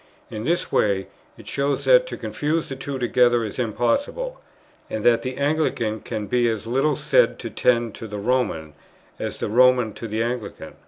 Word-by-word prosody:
In 110 Hz, +1 st, -5 dB
this 175 Hz, +4 st, 0 dB
way 100 Hz, -2 st, +2 dB, 0.3 s
it -, -, -14 dB
shows 140 Hz, 0 st, -1 dB
that -, -, +5 dB
to -, -, -6 dB
confuse 155 Hz, +2 st, -2 dB
the 135 Hz, -, -4 dB
two 135 Hz, +1 st, -5 dB
together 120 Hz, -1 st, +3 dB
is 110 Hz, +3 st, -6 dB
impossible, 125 Hz, -, -1 dB, 0.5 s
and 110 Hz, -, -4 dB
that 120 Hz, -1 st, +5 dB
the 130 Hz, 0 st, -5 dB
Anglican 140 Hz, -7 st, 0 dB
can 110 Hz, -1 st, -5 dB
be 120 Hz, +3 st, +2 dB
as 110 Hz, -2 st, -3 dB
little 135 Hz, +5 st, +1 dB
said -, -, +3 dB
to -, -, -7 dB
tend 120 Hz, -3 st, +1 dB
to 115 Hz, -, -8 dB
the 105 Hz, -1 st, -6 dB
Roman, 100 Hz, -9 st, -1 dB, 0.5 s
as -, -, -4 dB
the -, -, -2 dB
Roman 125 Hz, 0 st, +4 dB
to 115 Hz, +2 st, -7 dB
the 110 Hz, +1 st, -1 dB
Anglican. 120 Hz, -3 st, -5 dB
120 Hz, 180 wpm, -23 LUFS, 110-140 Hz, 0.5 s, that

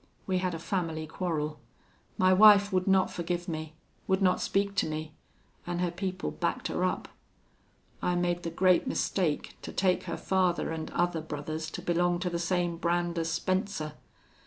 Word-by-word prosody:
We 185 Hz, -1 st, +1 dB
had 180 Hz, -2 st, -1 dB
a -, -, -3 dB
family 165 Hz, -2 st, -2 dB
quarrel. 155 Hz, -3 st, -3 dB, 0.6 s
My 185 Hz, 0 st, +5 dB
wife 205 Hz, 0 st, +7 dB
would 185 Hz, 0 st, +1 dB
not 190 Hz, -1 st, +4 dB
forgive 175 Hz, +1 st, -3 dB
me 155 Hz, -2 st, -5 dB, 0.3 s
would 190 Hz, 0 st, +2 dB
not 185 Hz, -2 st, +3 dB
speak 200 Hz, 0 st, 0 dB
to -, -, +2 dB
me, 155 Hz, 0 st, -4 dB, 0.5 s
an' 175 Hz, 0 st, -2 dB
her 175 Hz, -1 st, 0 dB
people 185 Hz, +1 st, -3 dB
backed -, -, -2 dB
her -, -, -1 dB
up. -, -, -1 dB, 0.9 s
I 180 Hz, -, +1 dB
made 175 Hz, 0 st, 0 dB
the 170 Hz, -, -3 dB
great 180 Hz, +2 st, +3 dB
mistake 165 Hz, -6 st, -1 dB
to -, -, -7 dB
take 185 Hz, -1 st, +1 dB
her -, -, -3 dB
father 180 Hz, -3 st, +1 dB
an' 160 Hz, -1 st, -4 dB
other 175 Hz, -2 st, 0 dB
brothers 155 Hz, +1 st, -5 dB
to -, -, -7 dB
belong 175 Hz, 0 st, +2 dB
to 180 Hz, -2 st, -1 dB
the 170 Hz, -, -1 dB
same 175 Hz, -1 st, 0 dB
brand 175 Hz, 0 st, 0 dB
as 165 Hz, 0 st, -1 dB
Spencer. 185 Hz, -2 st, -1 dB
175 Hz, 175 wpm, -29 LUFS, 165-185 Hz, 0.9 s, wife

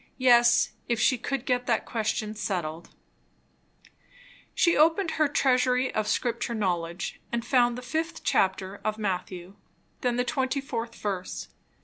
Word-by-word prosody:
Yes, 240 Hz, -2 st, +5 dB, 0.2 s
if 235 Hz, -2 st, +1 dB
she 255 Hz, -1 st, +3 dB
could 275 Hz, +1 st, -3 dB
get 250 Hz, -1 st, 0 dB
that 230 Hz, -2 st, +1 dB
question 215 Hz, -1 st, -2 dB
settled 175 Hz, -6 st, -4 dB, 1.7 s
She 340 Hz, -, +4 dB
opened 325 Hz, +3 st, +3 dB
her 310 Hz, -1 st, +2 dB
"Treasury 255 Hz, -2 st, +2 dB
of 215 Hz, -1 st, -1 dB
Scripture 235 Hz, +1 st, -1 dB
Knowledge" 175 Hz, -4 st, -2 dB
and 235 Hz, 0 st, -2 dB
found 245 Hz, -2 st, +3 dB
the 250 Hz, -, -7 dB
fifth 320 Hz, +5 st, -3 dB
chapter 190 Hz, +1 st, 0 dB
of 215 Hz, 0 st, -1 dB
Matthew; 185 Hz, -2 st, -4 dB, 0.4 s
then 245 Hz, -3 st, 0 dB
the 245 Hz, +1 st, 0 dB
24th 260 Hz, -3 st, -2 dB
verse. 195 Hz, -3 st, -4 dB
235 Hz, 130 wpm, -27 LUFS, 205-255 Hz, 1.7 s, Yes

